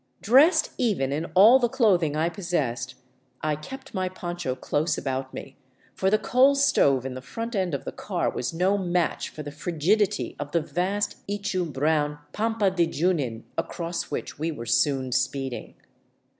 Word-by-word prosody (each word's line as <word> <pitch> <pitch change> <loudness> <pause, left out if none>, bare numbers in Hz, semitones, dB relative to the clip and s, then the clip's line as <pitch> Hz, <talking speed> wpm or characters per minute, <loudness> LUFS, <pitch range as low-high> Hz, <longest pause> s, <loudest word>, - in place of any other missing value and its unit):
Dressed 300 - +5
even 200 - +1
in 155 +3 -1
all 220 +8 +8
the 240 -2 +1
clothing 180 - +2
I 160 +2 +1
possessed, 150 - -2 0.5
I 155 -1 +1
kept 265 - -10
my 185 -1 -1
poncho 175 -6 -4
close 150 +5 -1
about 130 0 -3
me, 135 - -9 0.4
for 190 - +1
the 215 - +4
coal 255 +5 +4
stove 145 - +3
in 135 - -4
the 130 - -7
front 230 - -5
end 185 -6 0
of 140 - -6
the - - -4
car - - -2
was 125 - -2
no 185 +4 +1
match 175 -2 0
for 150 - -8
the 145 - -7
frigidity 165 - 0
of 145 0 -6
the 170 - +3
vast 180 +7 -2
ichu 195 -4 -2
brown 150 +1 +1 0.2
pampa 220 -2 +1
de 175 -3 +2
Junin 145 -9 -1 0.2
across 170 0 -4
which - - -5
we 160 +2 -1
were 120 -7 -7
soon 130 +2 +1
speeding. 130 0 -2
170 Hz, 170 wpm, -26 LUFS, 140-200 Hz, 0.5 s, all